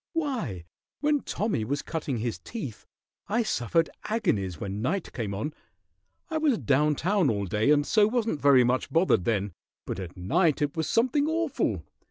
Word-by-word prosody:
Why, 235 - -2 0.4
when 295 0 +3
Tommy 210 - -2
was 140 +5 -2
cutting 155 -6 -3
his 115 +1 -3
teeth 170 - -7 0.4
I 230 +3 +1
suffered 165 - +1 0.2
agonies 100 - 0
when 100 +1 -4
night 165 - -2
came 110 -5 -3
on. 145 +10 -3 0.7
I 315 - -1
was 295 -7 +3
down 150 0 +2
town 185 0 +2
all 100 -3 0
day, 105 +7 +1
and 145 -1 +4
so 210 +4 +4
wasn't 225 - -1
very 140 -3 +6
much 125 +2 0
bothered 165 - +3
then, 105 -3 0 0.3
but - - -4
at 90 -1 -7
night 155 - +2
it 145 -1 -1
was 160 -2 -1
something 260 +5 +2
awful. 315 - 0
150 Hz, 170 wpm, -27 LUFS, -, 0.7 s, very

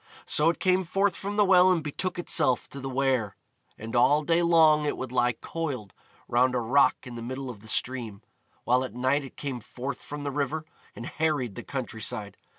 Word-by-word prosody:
So 150 +2 +3
it 170 - -1
came 185 0 +2
forth 195 +2 +1
from 200 +1 -5
the 210 -1 +4
well 185 -1 +6
and 170 -4 +1
betook 170 +5 -3
itself 150 -7 +2
to 140 - -7
the 135 0 -5
Wear. 130 -6 0 0.4
And 115 +2 -7
all 145 +5 +4
day 165 +2 +2
long 160 -3 +5
it - - -1
would 130 -2 -5
lie 125 -1 +2
coiled 130 - -5 0.3
round 125 +2 +2
a - - +2
rock 130 +6 +2
in 125 - -8
the 120 - -7
middle 130 +2 -5
of 110 - -12
the 110 - -14
stream, 115 -4 -3 0.4
while 125 +2 +2
at 125 -3 -7
night 130 +3 +1
it 135 - -12
came 135 -4 -4
forth 125 +4 -6
from 145 0 -7
the 140 - -2
river 145 +3 -2 0.3
and 120 - -7
harried 150 -9 -1
the - - -7
country 125 -5 -5
side. 105 0 -4
135 Hz, 210 wpm, -27 LUFS, 120-160 Hz, 0.4 s, well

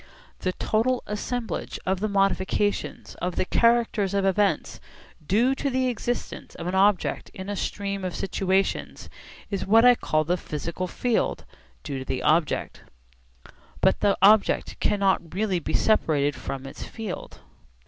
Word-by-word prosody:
The 185 - -1
total 240 +6 0
assemblage 225 +3 -4
of 190 0 0
the 215 - 0
modifications 195 0 0
of 180 0 -2
the - - 0
characters 230 -3 +2
of 195 -1 +1
events 195 +1 +1 0.4
due 225 - +2
to 275 +1 -2
the 255 -1 +1
existence 245 +1 -4
of 165 - -7
an 180 - -2
object 195 0 +2
in 190 +1 -7
a 205 - -2
stream 200 0 -3
of 180 -1 -3
situations 195 0 -1 0.4
is 195 -2 -2
what 225 +4 +6
I 250 - +9
call 155 -9 0
the 175 +4 0
'physical 170 +3 -4
field' 240 +5 -1 0.4
due 135 -2 -4
to 130 - -7
the 130 - -3
object. 160 0 +1 1.0
But - - +3
the 200 -1 +2
object 210 +1 +4
cannot 190 -4 +1
really 195 -3 0
be - - -2
separated 145 -9 +2
from 135 0 -6
its 135 - -9
field. 220 -5 -7
195 Hz, 150 wpm, -25 LUFS, 180-215 Hz, 1.0 s, I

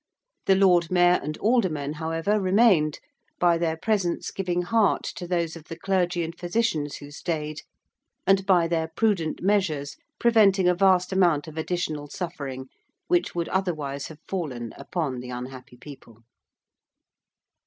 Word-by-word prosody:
The 195 - +6
Lord 180 -3 +4
Mayor 180 0 +4
and 155 +1 -5
Aldermen, 185 - +1
however, 165 +6 0
remained, 185 -6 +3 0.4
by 170 -1 +3
their 160 -1 0
presence 195 -2 -1
giving 180 -2 -1
heart 215 +3 +2
to 175 - -6
those 170 -2 -1
of 165 -2 -11
the 165 - -8
clergy 180 -1 0
and 165 +1 -5
physicians 175 -5 -1
who 145 0 -10
stayed, 155 -1 -4 0.6
and 195 0 +4
by 175 -3 +4
their 165 -1 0
prudent 165 -2 -1
measures 175 -8 0 0.2
preventing 205 -5 +4
a 180 - +5
vast 185 0 +3
amount 170 -6 +2
of 155 - -9
additional 160 -3 -3
suffering 140 -5 -6 0.4
which 175 0 +1
would 170 -1 -1
otherwise 155 -7 -2
have 160 - -11
fallen 130 - -4
upon 145 -8 -3
the 125 0 -8
unhappy 125 +1 -8
people. 120 -4 -13
170 Hz, 145 wpm, -25 LUFS, 150-190 Hz, 0.6 s, The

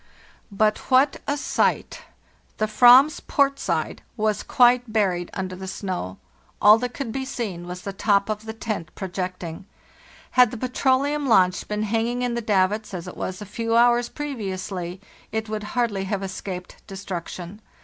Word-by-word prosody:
"But 215 +1 +2
what 265 +2 +4
a 285 - 0
sight! 290 - 0 0.6
The 215 - +1
/vam's 250 +7 +6
port 275 -1 +1
side 165 -4 -2 0.2
was 215 -1 0
quite 245 -1 +3
buried 185 -5 0
under 185 -1 -4
the 190 +1 -8
snow; 185 - -4 0.4
all 210 +2 +7
that 245 0 -4
could 275 -5 -4
be 265 +3 -3
seen 210 -10 -5
was 180 0 -7
the 200 - -5
top 200 0 +2
of 215 0 -4
the 220 - -4
tent 215 -7 -4
projecting. 185 -2 -5 0.6
Had 250 -2 +6
the 240 - -7
petroleum 270 +4 +1
launch 185 -6 +3
been 210 0 -2
hanging 230 +3 -1
in 245 -1 0
the 235 - -2
davits, 205 0 +1
as 175 0 -6
it 180 - -8
was 185 +2 -5
a - - -9
few 230 +3 -2
hours 240 0 +4
pre 295 -1 -5
viously, 185 -4 -5 0.3
it 220 0 -2
would 215 0 -3 0.2
hardly 210 -5 0
have 200 0 -2
escaped 185 -1 -6
destruction. 190 0 -7
215 Hz, 165 wpm, -24 LUFS, 185-240 Hz, 0.6 s, all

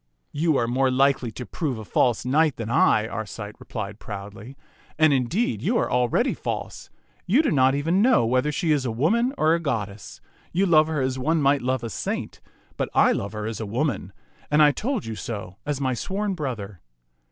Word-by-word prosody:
" - - -48
You 160 -4 +3
are 115 - +1
more 130 +2 +2
likely 130 -1 +2
to 125 - -7
prove 145 -5 -3
a 110 - -8
false 120 +2 +1
knight 150 +3 +2
than 115 0 -5
I," 110 -2 +3
Arcite 110 -1 -6
replied 105 -2 -6
proudly, 105 +5 -9 0.2
" - - -30
and, 155 -2 +5
indeed, 170 - 0
you 235 +3 +1
are - - 0
al 125 0 +2
ready - - +1
false. - - -5 0.4
You 255 - +4
do - - +1
not 130 -2 +4
know - - 0
even 165 +7 +1
now 245 - +4
whether 130 +5 +1
she 160 +2 0
is 145 -3 +2
a 130 - -2
woman 210 - +1
or 155 +1 +3
a 170 - +1
goddess. 105 - -4 0.3
You 190 +3 +2
love 155 -4 +5
her 155 -3 -1
as 130 0 -1
one 160 +5 +1
might 140 0 +3
love 130 0 -1
a 115 - -3
saint, - - -4 0.4
but - - -1
I - - +5
love 100 +2 -3
her 105 -1 -4
as 110 -1 -4
a 110 - -3
woman, 120 -4 -2 0.4
and 150 +1 +5
I 150 - +6
told 240 - -3
you 115 - -4
so 105 -4 -6
as 145 -2 -1
my 130 -2 0
sworn 195 - -2
brother. 110 - -5
130 Hz, 215 wpm, -24 LUFS, 110-155 Hz, 0.4 s, I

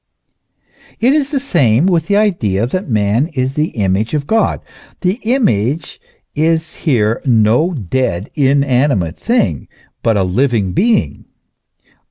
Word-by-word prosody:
It 250 +4 +3
is 290 -2 +1
the 285 -2 -1
same 155 - +2
with 175 -4 +1
the 200 - +1
idea 115 - +1
that 185 +7 -4
man 110 +5 +1
is 130 0 -1
the 150 +2 0
image 100 +5 0
of 145 -2 -2
God. 220 +7 0 0.4
The 185 +5 0
image 155 - -1 0.3
is 160 +1 0
here 115 -7 0
no 120 +8 +2
dead, 105 - -2
inanimate 135 - +1
thing, 95 - 0 0.3
but 115 -2 +1
a 95 - +2
living 100 0 0
being. 225 - 0
135 Hz, 130 wpm, -15 LUFS, 110-175 Hz, 0.4 s, It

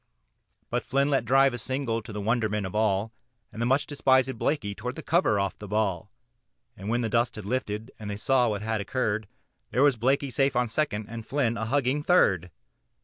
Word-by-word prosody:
But - - 0
Flynn 140 +2 +1
let 135 -4 +1
drive 135 +2 +4
a 120 - -4
single 125 -2 -2
to 110 - -10
the 105 - -5
wonderment 105 -1 0
of 95 - -6
all, 105 0 +1 0.4
And 115 - -7
the 120 - +1
much 135 +3 +2
despisèd 130 -3 +2
Blakey 110 -9 -1
tore 125 +5 -5
the 160 - -8
cover 165 - +2
off 100 -1 -2
the 105 - -8
ball, 100 -3 -1 0.7
And 95 +2 -7
when 120 +2 +1
the 115 - 0
dust 115 +2 +1
had 110 - -7
lifted 110 0 -3
and 105 -1 -6
they 100 - -4
saw 125 +2 +2
what 105 -1 -3
had 110 -1 -1
occurred, 110 -1 -1 0.4
There 130 - +2
was 140 -4 +4
Blakey 135 +4 +1
safe 135 +3 +1
on 125 -1 +1
second, 110 -5 -1
and 115 0 -7
Flynn 120 -1 0
a 110 -1 -3
hugging 135 +3 +1
third. 95 - +3
115 Hz, 205 wpm, -27 LUFS, 105-135 Hz, 0.7 s, drive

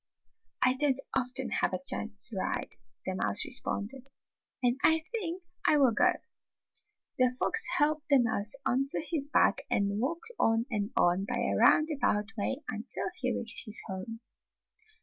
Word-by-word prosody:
"I 255 - +4
don't 270 0 +1 0.2
often 250 -1 0
have 190 - 0
a - - -4
chance 215 -2 +1
to 225 - -8
ride," 185 - -3 0.3
the - - -2
mouse - - +2
responded, 250 +6 -2 0.6
"and 245 +1 +1
I 320 0 +4
think 375 -6 -4 0.2
I 305 - +5
will 265 -5 +4 1.3
The 255 0 +5
fox 450 +8 +2
helped 305 0 +1
the 280 -2 +6
mouse 220 -1 +1
onto 270 +3 +1
his 290 -3 0
back 300 - +2
and 200 +1 0
walked 335 - -3
on 225 +1 +2
and 205 -2 -2
on 175 +3 +2
by - - -3
a 100 - 0
roundabout 225 - +2
way 260 +7 -3
until 225 - -3
he 255 -9 -2
reached 230 -1 -1
his 215 - -1
home. 190 +5 -7
250 Hz, 150 wpm, -30 LUFS, 215-295 Hz, 1.3 s, the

